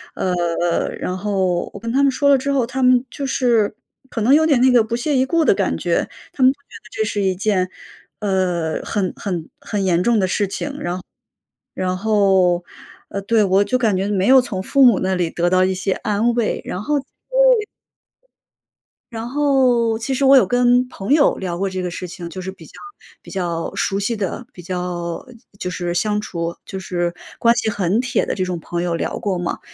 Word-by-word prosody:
呃 175 -1 0
然 180 - -3
后 185 -3 -1
我 - - -8
跟 230 - -3
他 270 +3 +2
们 280 - +4
说 280 +2 +1
了 275 - +6
之 280 +2 -1
后， 260 -4 +2
他 260 +2 -4
们 250 -1 +4
就 280 - -4
是 235 -6 +1 0.3
可 230 - -4
能 240 +6 +4
有 315 +2 +5
点 280 -6 +3
那 260 - +5
个 245 -2 +6
不 230 +1 -2
屑 270 +4 0
一 260 - +3
顾 330 +4 +1
的 - - +4
感 - - -1
觉。 - - -1 0.2
他 - - -7
们 255 - +8
不 - - -32
觉 - - -46 0.2
得 210 - -15
这 220 - -1
是 205 0 -2
一 190 -1 +1
件， 185 -1 0 0.5
呃， 185 -5 -1
很 190 -3 -2
很 175 -6 -4
很 205 -2 -3
严 175 -2 +2
重 235 +2 +3
的 190 - +1
事 205 +2 0
情。 275 +9 -5
然 175 -4 -3 0.8
然 185 0 -1
后， 190 -4 +2 0.4
呃， 200 - -4
对， 220 +1 +2
我 195 +1 +3
就 255 - 0
感 220 -5 +1
觉， 195 +2 -1
没 195 -2 0
有 265 +2 +7
从 195 -7 -4
父 275 +6 +4
母 240 -6 +6
那 190 0 0
里 175 -3 -1
得 175 0 0
到 185 0 +4
一 185 0 0
些 190 +1 -1
安 210 +5 0
慰， 235 -3 0
然 185 - -5
后 295 +7 0 2.2
然 225 +1 -5
后 255 -5 +2
其 265 +3 -2
实 275 +1 +1
我 270 +1 +7
有 - - +5
跟 245 0 +3
朋 200 0 -6
友 295 -1 +4
聊 180 -3 -4
过 195 +2 -1
这 185 0 -4
个 180 - -2
事 180 - -6
情， 175 0 -8
就 185 +3 -7
是 190 +1 -5
比 185 -4 -14
较 - - -17 0.5
比 - - -14
较 170 -3 -3
熟 195 0 0
悉 215 +4 -1
的， 205 +3 -4
比 180 - -11
较 175 0 -4 0.3
就 180 - -3
是 175 -1 -3
相 210 +3 0
处 170 -5 -4
就 190 - -6
是 175 -2 -2 0.3
关 235 0 +4
系 - - 0
很 205 +1 0
铁 255 -1 0
的 - - -2
这 185 - -1
种 180 -2 -3
朋 170 +2 -4
友 175 -1 -1
聊 - - -3
过 195 -3 -1
嘛。 175 -1 -3
200 Hz, 230 characters per minute, -20 LUFS, 180-245 Hz, 2.2 s, 们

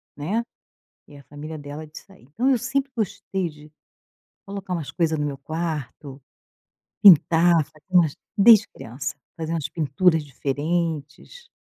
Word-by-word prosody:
né. 195 +11 -2 0.7
E 145 - -14
a 140 - -15
família 155 +2 -8
dela 145 +1 -8
é - - -10
disso 155 +6 -13
aí. 190 - -20
Então 210 - -2
eu 260 - +3
sempre 270 +4 -2
gostei 190 -3 -2
de 150 -1 -15 0.7
colocar 195 -2 -7
umas 150 -6 -4
coisa 160 0 0
no 150 - -2
meu 140 -2 -5
quarto, 150 -3 -5 0.8
pintar, 170 -3 +6
fazer 155 0 -24
umas 175 -5 +3 0.2
desde 220 +1 +7
criança. 135 +5 -7 0.2
Fazer 165 0 -3
umas 155 -3 -2
pinturas 160 +2 +1
diferentes 150 - -3
160 Hz, 145 wpm, -23 LUFS, 145-185 Hz, 0.8 s, desde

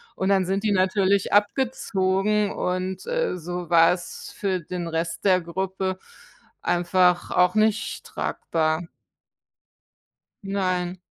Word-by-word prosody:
und 190 - -1
dann 195 -2 +3
sind 195 +3 -1
die 210 - +1
natürlich 195 +1 +2
abgezogen 205 -3 +1
und, 185 +1 -3
äh, - - -1
so 175 0 -6
war 165 -1 +6
es 175 -1 -8
für 190 -2 -1
den 175 +1 -5
Rest 165 +2 -3
der 185 -2 +4
Gruppe 190 +2 -3 0.6
einfach 175 0 +2
auch 180 +1 +3
nicht 215 0 +1
tragbar. 160 0 -1 1.6
Nein. 185 -2 -1
185 Hz, 115 wpm, -24 LUFS, 175-200 Hz, 1.6 s, war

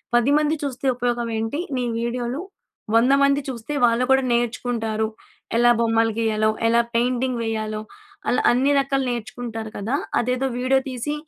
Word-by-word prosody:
10 240 +4 +3
మంది 305 +1 +2
చూస్తే 275 -1 -4
ఉపయోగం 240 -1 -1
ఏంటి 225 +7 -2 0.2
నీ 250 - 0 0.2
వీడియోలు? 240 +4 -2 0.5
100 245 +4 +5
మంది 280 +1 +3
చూస్తే 250 +1 -5
వాళ్ళు 235 +1 +2
కూడా 265 0 +5
నేర్చుకుంటారు. 230 -2 -1 0.5
ఎలా 240 +1 +5
బొమ్మలు 225 -1 +2
గీయాలో, 215 -1 +1 0.2
ఎలా 235 +1 +4
పెయింటింగ్ 250 +1 +1
వేయాలో. 215 -1 -3 0.5
అలా - - +2
అన్నీ 260 +4 +2
రకాలు 275 0 0
నేర్చుకుంటారు 230 -1 -5
కదా! 220 +7 -1 0.2
అదేదో 250 +2 0
వీడియో 260 +1 +3
తీసి 255 +3 -3
240 Hz, 145 wpm, -22 LUFS, 225-260 Hz, 0.5 s, 100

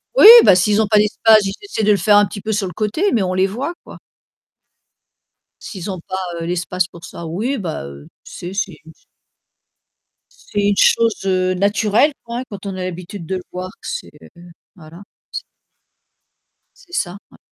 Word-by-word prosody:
Oui, 425 - +8 0.2
bah, 190 - +7
s'ils 205 +3 +2
ont 220 - +3
pas 210 0 +2
d'espace, 215 +1 +4
ils 195 0 -3
essaient 400 - -3
de 210 - +4
le 205 - +4
faire 205 +3 +4
un 205 - +5
petit 200 +2 -8
peu 220 - -3
sur 200 -2 -1
le 180 - -8
côté, 220 - -1
mais 215 -5 +2
on 185 - -2
les 185 +1 +2
voit, 255 - -4
quoi. - - -12 1.6
S'ils 185 -5 -8
n'ont 185 -2 -5
pas, 190 0 -4 0.2
heu, 165 - -4
l'espace 180 +1 -2
pour 170 -1 -13
ça 170 - -9
oui, 220 +12 -2
bah, 165 - -5
heu, 70 0 -11 0.2
c'est 175 +2 -8
c'est 195 -3 -2
u 160 - -13 1.4
c'est 205 - -7
une 200 - 0
chose, 230 -3 +2
heu, 185 -1 +1
naturelle, 210 +8 +2
quoi, 235 +1 -5
hein, - - -4
quand 200 -1 -9
on 195 - -4
a 185 - -5
l'habitude 180 0 -7
de 190 - -3
le 180 - -8
voir. 185 +1 -6
C'est, - - -6
heu - - -15 0.5
voilà, 170 +1 -14 0.3
c - - -5 1.3
C'est 355 - -21
ça, 180 - -2
ouais. - - -18
195 Hz, 190 wpm, -18 LUFS, 180-215 Hz, 1.6 s, Oui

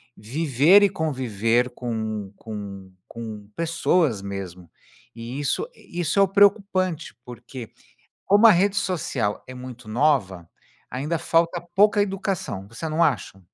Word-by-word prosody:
viver 150 - +4
e 200 - +5
conviver 125 - 0
com 110 -5 -4
com 100 -4 -8 0.2
com 110 -3 -8
pessoas 165 - +1
mesmo. 95 -3 -7 0.5
E 120 +4 -6
isso 145 - -1
e 175 - -10
isso 170 +4 0
é - - +7
o 195 - +5
preocupante, 195 -4 +2
porque 120 -1 -9 0.5
como 205 +3 +6
a - - +9
rede 195 +2 +2
social 135 - -1
é 130 - -8
muito 125 -2 -10
nova, 110 - +1 0.4
ainda 150 +6 -2
falta 165 +2 +1
pouca 205 +1 +5
educação, 190 - -3
você 115 +9 -6
não 155 +2 +1
acha? 105 - 0
130 Hz, 135 wpm, -24 LUFS, 110-175 Hz, 0.5 s, a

